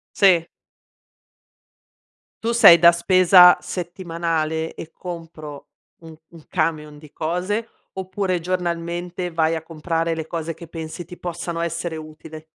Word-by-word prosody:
Sì. 180 Hz, -4 st, +4 dB, 2.0 s
Tu 230 Hz, -, 0 dB
sei 210 Hz, -8 st, +9 dB
da 170 Hz, +1 st, +7 dB
spesa 180 Hz, +1 st, +6 dB
settimanale 165 Hz, -3 st, -3 dB
e 165 Hz, -, -9 dB
compro 160 Hz, -5 st, -9 dB, 0.3 s
un 160 Hz, -1 st, -12 dB
un 165 Hz, -2 st, -15 dB
camion 155 Hz, -3 st, -2 dB
di 150 Hz, -2 st, -15 dB
cose, 185 Hz, +8 st, -2 dB, 0.3 s
oppure 190 Hz, -1 st, -2 dB
giornalmente 175 Hz, 0 st, -3 dB
vai 165 Hz, 0 st, +1 dB
a 160 Hz, -, -5 dB
comprare 165 Hz, +1 st, -2 dB
le 160 Hz, -1 st, -5 dB
cose 165 Hz, -1 st, -4 dB
che 170 Hz, -, -12 dB
pensi 165 Hz, +1 st, -7 dB
ti 175 Hz, +2 st, -12 dB
possano 170 Hz, -1 st, -5 dB
essere 170 Hz, 0 st, -3 dB
utile? 155 Hz, 0 st, -11 dB
170 Hz, 125 wpm, -21 LUFS, 160-180 Hz, 2.0 s, sei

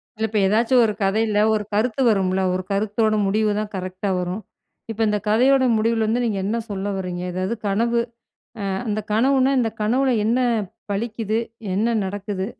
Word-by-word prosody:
இல்ல 220 Hz, 0 st, -1 dB
இப்ப 215 Hz, 0 st, 0 dB
ஏதாச்சும் 230 Hz, +5 st, +3 dB
ஒரு 215 Hz, -, 0 dB
கதையில 210 Hz, +2 st, +1 dB
ஒரு 215 Hz, -1 st, 0 dB
கருத்து 225 Hz, +4 st, 0 dB
வரும்ல? 190 Hz, -3 st, +1 dB
ஒரு 185 Hz, 0 st, -2 dB
கருத்தோட 215 Hz, +2 st, +1 dB
முடிவுதான் 210 Hz, +1 st, 0 dB
கரெக்ட்டா 185 Hz, +1 st, -4 dB
வரும். 180 Hz, +4 st, -3 dB, 0.5 s
இப்ப 225 Hz, 0 st, -4 dB
இந்த 210 Hz, 0 st, +1 dB
கதையோட 260 Hz, +5 st, +4 dB
முடிவுல 225 Hz, 0 st, +1 dB
வந்து 240 Hz, +3 st, +1 dB
நீங்க 215 Hz, -4 st, -1 dB
என்ன 215 Hz, +4 st, -1 dB
சொல்ல 200 Hz, 0 st, -3 dB
வர்றீங்க? 180 Hz, -2 st, -4 dB
ஏதாவது 185 Hz, +4 st, -2 dB
கனவு, 235 Hz, +4 st, +1 dB, 0.7 s
ஆ -, -, -1 dB, 0.2 s
அந்த 215 Hz, 0 st, -1 dB
கனவுனா, 260 Hz, +4 st, +3 dB
இந்த 225 Hz, -, 0 dB
கனவுல 255 Hz, +4 st, +2 dB
என்ன 230 Hz, +2 st, +2 dB, 0.6 s
பலிக்குது? 220 Hz, +1 st, -2 dB, 0.3 s
என்ன 210 Hz, +4 st, +1 dB, 0.2 s
நடக்குது? 195 Hz, 0 st, -4 dB
215 Hz, 155 wpm, -22 LUFS, 195-230 Hz, 0.7 s, கதையோட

